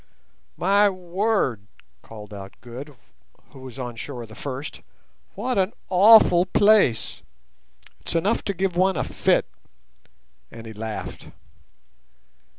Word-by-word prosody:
"My 200 +3 +4
word," 185 - -1 0.3
called 105 -2 -11
out 100 -1 -9
Good, 130 +5 -9 0.6
who 135 - -14
was 130 -1 -10
on 125 -2 -5
shore 120 +1 -7
the 110 - -14
first, 135 +4 -7 0.5
"what 255 -5 -1
an 190 +3 0 0.2
awful 190 -2 +6
place! 200 - +3 0.8
It's - - -5
enough 195 +7 +1
to 200 - -2
give 185 -1 -1
one 190 +1 +2
a - - 0
fit." - - +1 1.0
And 115 0 -11
he 110 - -8
laughed. 110 0 -7
155 Hz, 120 wpm, -23 LUFS, 115-195 Hz, 1.0 s, awful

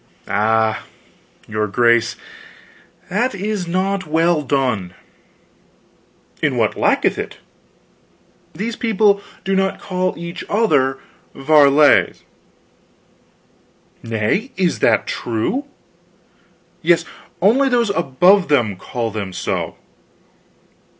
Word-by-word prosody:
"Ah, 110 +1 +1 0.6
your 105 0 -2
grace, 115 +2 +2 1.0
that 240 +6 0
is 200 -2 -3
not 190 +1 -1
well 165 +1 +2
done." 125 -10 -1 1.5
"In - - 0
what - - +1
lacketh - - +1
it?" - - -6 1.2
"These 225 +3 -4
people 210 -3 +2 0.2
do 195 0 0
not 190 0 0
call 185 -1 -2
each 170 +1 -7
other 145 -12 +2 0.4
varlets." 145 0 +4 1.8
"Nay, 115 - -1
is 185 -3 0
that - - +2
true?" 120 - -2 1.2
"Yes; 170 +1 +2 0.3
only 250 +9 +3
those 235 -4 +1
above 175 +4 +3
them 120 -10 +1
call 115 +3 -4
them 100 -3 -5
so." - - -3
165 Hz, 90 wpm, -19 LUFS, 120-195 Hz, 1.8 s, varlets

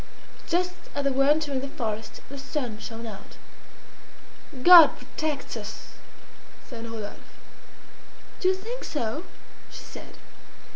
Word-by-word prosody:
Just 360 +1 +1 0.2
as 285 - -1
they 275 - +2
were 270 +1 +3
entering 295 -2 +2
the 275 - -4
forest 225 -5 -4
the 280 0 -8
sun 260 -5 -4
shone 225 +1 -7
out. 215 -3 -10 1.3
"God 345 -4 +10
protects 285 +3 -4
us!" - - -7 0.8
said 230 -2 -7
Rodolphe. 215 -2 -7 1.2
"Do 370 - +1
you 375 - +4
think 460 +6 -6
so?" 290 +4 -3 0.4
she - - -10
said. - - -11
275 Hz, 125 wpm, -26 LUFS, 230-315 Hz, 1.3 s, God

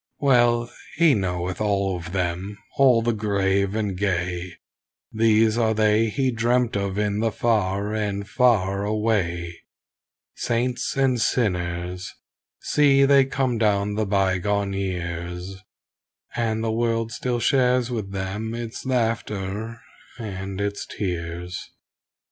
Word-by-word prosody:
Well 120 -4 +3 0.2
he 165 -3 +5
knoweth 90 -3 -2
all 100 -2 +1
of 85 0 -7
them, 90 +2 -2 0.2
all 125 -4 +5
the 120 0 +1
grave 100 -2 0
and 105 -3 -1
gay, 90 -2 -2 0.6
These 110 0 +3
are 110 -1 +2
they 110 +1 +3
he 130 +4 0
dreamt 120 0 +1
of 100 -1 -2
in 105 0 0
the 115 0 +1
far 105 -2 0
and 100 -2 -2
far 100 -5 +2
away; 100 -6 -1 0.7
Saints 120 +3 -1
and 130 -3 +2
sinners, 90 -5 -1 0.5
see 140 -2 +4
they 140 -1 +5
come 130 -3 -1
down 105 -2 +1
the 105 0 -1
bygone 100 +1 +1
years, 90 -1 -4 0.8
And 110 -2 -1
the 115 - 0
world 115 0 0
still 120 +1 -2
shares 125 -1 +2
with 105 -5 -3
them 100 +4 -4
its 115 +2 -6
laughter 115 -2 -2 0.4
and 95 -4 -5
its 100 0 -3
tears. 90 -2 -4
105 Hz, 120 wpm, -24 LUFS, 95-115 Hz, 0.8 s, he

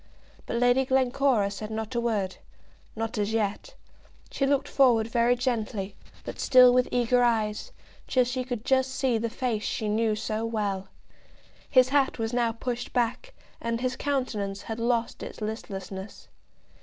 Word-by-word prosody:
But - - -2
Lady 245 +2 +4
Glencora 260 -5 +2
said 210 +1 -6
not 220 +1 -4
a 235 - 0
word, 205 -6 -1 0.6
not 225 0 -3
as 205 +1 -1
yet. 225 - -2 0.6
She 275 - 0
looked 280 0 +1
forward 245 -5 +4
very 235 +1 +2
gently, 220 -5 -2 0.3
but - - -7
still 255 -2 +7
with 250 0 +3
eager 245 0 +2
eyes, 225 - 0 0.4
till 255 - +3
she 250 +1 -2
could 245 -3 -5
just 265 0 +2
see 255 -4 +1
the 230 +1 -2
face 235 -2 -2
she 215 - -2
knew 215 +1 +1
so 215 0 -3
well. 205 -4 -2 0.8
His 255 -1 +5
hat 275 -1 +2
was 225 0 -2
now 240 -1 +2
pushed 240 +1 -5
back, 250 - -1 0.3
and 230 0 -1
his 255 0 -1
countenance 215 -9 -2
had 225 0 -5
lost 235 0 0
its - - -8
listlessness. 200 -2 -6
235 Hz, 155 wpm, -27 LUFS, 215-255 Hz, 0.8 s, still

